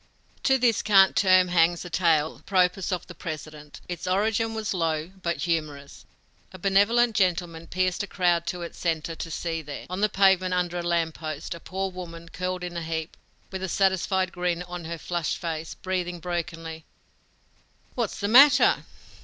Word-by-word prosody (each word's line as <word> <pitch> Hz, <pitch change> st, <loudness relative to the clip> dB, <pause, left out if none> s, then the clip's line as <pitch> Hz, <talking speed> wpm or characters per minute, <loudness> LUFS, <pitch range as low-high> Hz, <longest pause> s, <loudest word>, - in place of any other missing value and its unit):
To 265 Hz, -1 st, +5 dB
this 240 Hz, -4 st, +2 dB
cant 195 Hz, -2 st, +5 dB
term 185 Hz, -2 st, +5 dB
hangs 175 Hz, 0 st, +2 dB
a -, -, -7 dB
tale 160 Hz, -4 st, +2 dB
apropos 185 Hz, -1 st, +1 dB
of 175 Hz, -, -9 dB
the 175 Hz, -, -11 dB
President. 155 Hz, -2 st, -8 dB
Its 175 Hz, -1 st, -5 dB
origin 220 Hz, +4 st, +1 dB
was 220 Hz, -1 st, -2 dB
low, 165 Hz, -1 st, -1 dB
but 170 Hz, -5 st, -2 dB
humorous. 150 Hz, -4 st, -3 dB, 0.5 s
A 185 Hz, -, -10 dB
benevolent 205 Hz, +5 st, +3 dB
gentleman 175 Hz, -4 st, 0 dB
pierced 185 Hz, +2 st, 0 dB
a 205 Hz, -, -4 dB
crowd 175 Hz, -3 st, +1 dB
to 180 Hz, -1 st, -3 dB
its 170 Hz, -, -8 dB
center 165 Hz, -1 st, -1 dB
to 165 Hz, -, -6 dB
see 165 Hz, 0 st, -3 dB
there, 145 Hz, -2 st, -8 dB
on 185 Hz, +2 st, -3 dB
the 210 Hz, -, +3 dB
pavement 190 Hz, -2 st, +3 dB
under 175 Hz, -1 st, -1 dB
a -, -, -2 dB
lamp 170 Hz, -2 st, 0 dB
post, 155 Hz, -2 st, -5 dB
a 170 Hz, -, -9 dB
poor 190 Hz, +2 st, -4 dB
woman, 170 Hz, -2 st, -9 dB
curled 180 Hz, +1 st, -4 dB
in 175 Hz, -1 st, -5 dB
a 170 Hz, -, -3 dB
heap, 160 Hz, 0 st, -4 dB, 0.4 s
with 190 Hz, -1 st, -5 dB
a 190 Hz, -, -3 dB
satisfied 190 Hz, 0 st, +1 dB
grin 180 Hz, -1 st, -2 dB
on 175 Hz, -1 st, -7 dB
her 170 Hz, +1 st, -5 dB
flushed 170 Hz, -1 st, -2 dB
face, 160 Hz, -1 st, -5 dB
breathing 180 Hz, -2 st, -3 dB
brokenly. 165 Hz, -2 st, -5 dB, 1.1 s
"What's 235 Hz, -5 st, -2 dB
the 200 Hz, -, -1 dB
matter?" 270 Hz, +6 st, +6 dB
175 Hz, 175 wpm, -26 LUFS, 165-190 Hz, 1.1 s, matter